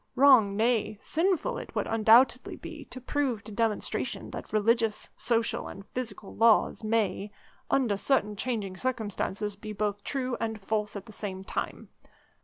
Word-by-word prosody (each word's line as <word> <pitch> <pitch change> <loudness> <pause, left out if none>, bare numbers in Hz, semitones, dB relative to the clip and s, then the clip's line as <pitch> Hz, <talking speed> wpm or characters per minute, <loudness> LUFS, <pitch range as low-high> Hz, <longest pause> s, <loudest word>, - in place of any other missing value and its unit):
Wrong, 245 -7 +6
nay, 220 -2 +1
sinful 370 - 0
it - - -10
would - - 0
undoubtedly 225 +3 +4
be - - -9
to 255 - -9
prove 255 -4 -1
to 215 - -10
demonstration 220 0 -1
that - - -7
religious, 225 0 +1
social, 230 -1 0
and 195 0 -9
physical 235 -5 -5
laws, 225 0 +4
may, 215 -2 0 0.4
under 245 -7 +2
certain 210 -1 +1
changing 205 -4 -2
circumstances, 210 -4 -2
be 215 +1 -7
both 205 0 -2
true 255 -3 -2
and 220 -1 -2
false 210 +1 -2
at 200 - -6
the 225 - -12
same 190 -2 -5
time. - - -4
220 Hz, 150 wpm, -29 LUFS, 205-245 Hz, 0.4 s, Wrong